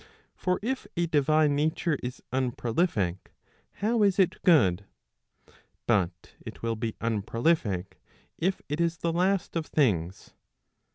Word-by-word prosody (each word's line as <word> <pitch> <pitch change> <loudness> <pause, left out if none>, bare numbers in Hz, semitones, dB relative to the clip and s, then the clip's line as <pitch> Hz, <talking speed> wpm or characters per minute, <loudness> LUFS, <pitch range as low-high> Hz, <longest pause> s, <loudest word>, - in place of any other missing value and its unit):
For 180 0 0
if 260 +3 -2
a 170 - +2
divine 155 -1 +3
nature 155 +2 0
is 125 +1 -6
unprolific 120 - 0 0.7
how 230 +1 +2
is 200 -2 +3
it 190 -3 +2
good? 100 - +4 1.0
But 90 -6 0
it - - -10
will 115 -1 0
be 110 0 -3
unprolific, 115 - -1 0.4
if 190 +3 -1
it 150 +3 -2
is 170 0 +1
the 170 0 -1
last 185 +2 0
of 165 -2 -2
things. 95 - 0
145 Hz, 125 wpm, -28 LUFS, 110-170 Hz, 1.0 s, good